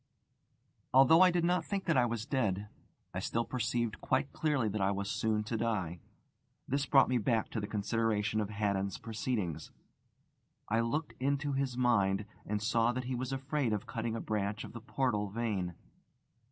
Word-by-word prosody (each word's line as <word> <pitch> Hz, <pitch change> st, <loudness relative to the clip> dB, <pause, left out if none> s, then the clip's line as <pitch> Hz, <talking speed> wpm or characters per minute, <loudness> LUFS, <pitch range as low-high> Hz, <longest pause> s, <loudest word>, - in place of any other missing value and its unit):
Although 150 Hz, +6 st, +7 dB
I 185 Hz, -, +8 dB
did 175 Hz, -1 st, +1 dB
not 180 Hz, +1 st, +2 dB
think 195 Hz, -1 st, -3 dB
that 165 Hz, -, +2 dB
I 125 Hz, -1 st, +4 dB
was 115 Hz, -1 st, -3 dB
dead, 105 Hz, -6 st, -1 dB, 0.4 s
I -, -, -2 dB
still 115 Hz, 0 st, -1 dB
perceived 120 Hz, -2 st, -1 dB
quite 140 Hz, -, 0 dB
clearly 145 Hz, -7 st, +1 dB
that 105 Hz, 0 st, -2 dB
I 95 Hz, -, +3 dB
was 100 Hz, +1 st, -2 dB
soon 110 Hz, -1 st, 0 dB
to 110 Hz, +1 st, -3 dB
die. 95 Hz, -7 st, -1 dB, 0.7 s
This 140 Hz, +2 st, 0 dB
brought 135 Hz, -1 st, +6 dB
me 125 Hz, -1 st, +2 dB
back 110 Hz, +1 st, 0 dB
to 115 Hz, -, -2 dB
the 105 Hz, -, -3 dB
consideration 110 Hz, 0 st, 0 dB
of 105 Hz, -, -3 dB
Haddon's 100 Hz, -2 st, -1 dB
proceedings. 105 Hz, -, -3 dB, 1.0 s
I 115 Hz, +2 st, +2 dB
looked 145 Hz, +7 st, -1 dB
into 140 Hz, +2 st, 0 dB
his 135 Hz, -2 st, -1 dB
mind, 100 Hz, -5 st, +2 dB, 0.2 s
and 105 Hz, 0 st, -1 dB
saw 115 Hz, +2 st, +3 dB
that 130 Hz, +1 st, -3 dB
he 130 Hz, +1 st, -3 dB
was 125 Hz, +1 st, -3 dB
afraid 135 Hz, -2 st, -1 dB
of 105 Hz, -, -2 dB
cutting 115 Hz, 0 st, -3 dB
a -, -, -2 dB
branch 105 Hz, -1 st, -2 dB
of -, -, -9 dB
the 115 Hz, -, -7 dB
portal 115 Hz, -4 st, 0 dB
vein. 100 Hz, -5 st, -2 dB
115 Hz, 180 wpm, -32 LUFS, 105-130 Hz, 1.0 s, I